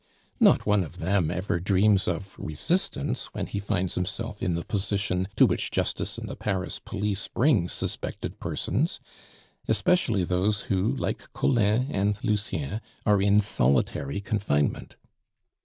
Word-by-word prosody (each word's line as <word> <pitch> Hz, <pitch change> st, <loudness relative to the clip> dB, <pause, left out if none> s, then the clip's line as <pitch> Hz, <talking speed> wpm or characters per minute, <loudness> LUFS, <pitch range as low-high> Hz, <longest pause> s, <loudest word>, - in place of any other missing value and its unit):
Not -, -, +5 dB
one 105 Hz, -2 st, +3 dB
of 80 Hz, -, -9 dB
them 90 Hz, -1 st, +1 dB
ever 90 Hz, 0 st, -1 dB
dreams 100 Hz, +2 st, +3 dB
of 95 Hz, +3 st, -3 dB
resistance 140 Hz, -, -1 dB
when 100 Hz, -, -2 dB
he 100 Hz, -, -4 dB
finds 100 Hz, -3 st, -1 dB
himself 105 Hz, +4 st, -3 dB
in 90 Hz, -, 0 dB
the 85 Hz, -, -4 dB
position 100 Hz, -2 st, -1 dB
to -, -, +7 dB
which -, -, 0 dB
justice -, -, -1 dB
and -, -, -6 dB
the -, -, -6 dB
Paris 95 Hz, -3 st, -2 dB
police 105 Hz, -2 st, -3 dB
bring 115 Hz, -, +2 dB
suspected -, -, -3 dB
persons, -, -, -1 dB, 0.7 s
especially 115 Hz, -, +2 dB
those 95 Hz, +4 st, +1 dB
who, 100 Hz, +7 st, 0 dB
like 130 Hz, -, -4 dB
Collin 115 Hz, +2 st, +2 dB
and 100 Hz, +1 st, +1 dB
Lucien, 105 Hz, -, -1 dB, 0.2 s
are 105 Hz, -2 st, +4 dB
in 100 Hz, +1 st, +5 dB
solitary 70 Hz, -, +1 dB
confinement. 100 Hz, -8 st, -1 dB
100 Hz, 140 wpm, -27 LUFS, 90-105 Hz, 0.7 s, to